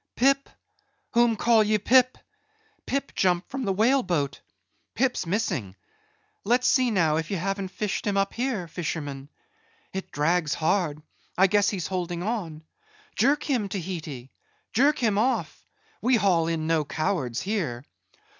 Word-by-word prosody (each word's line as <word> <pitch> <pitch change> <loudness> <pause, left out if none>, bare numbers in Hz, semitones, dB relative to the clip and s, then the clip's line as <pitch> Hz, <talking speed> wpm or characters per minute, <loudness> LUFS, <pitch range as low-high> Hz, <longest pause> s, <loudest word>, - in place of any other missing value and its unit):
"Pip? 275 +2 +2 0.6
whom 235 -1 +3
call 225 0 +4
ye 215 0 +2
Pip? 255 +4 +4 0.7
Pip 275 +1 -2
jumped 180 -2 +1
from 265 -1 -3
the 195 - +1
whale 235 +8 +3
boat. 150 - -2 0.5
Pip's 250 -8 0
missing. 165 - -2 0.7
Let's 250 +1 +2
see 255 -3 +3
now 165 -8 +2
if 160 0 -3
ye 195 - -1
haven't 195 +2 -2
fished 210 +2 -3
him 200 -1 +1
up 195 0 +1
here, 235 -8 -2
fisherman. 145 -4 -5 0.6
It 190 0 -5
drags 160 +1 +1
hard; 155 -3 0 0.3
I 190 - +6
guess 205 +1 +3
he's 185 -6 -3
holding 175 -2 -3
on. 180 -8 -3 0.5
Jerk 280 +6 +2
him, 240 -8 0
Tahiti! 160 -9 -6 0.4
Jerk 280 +6 +4
him 215 -4 +1
off; 255 +4 -1 0.4
we 250 +1 +3
haul 180 -7 +2
in 165 -1 -1
no 160 -1 +2
cowards 145 -4 -2
here. 160 - -2
190 Hz, 145 wpm, -26 LUFS, 160-230 Hz, 0.7 s, I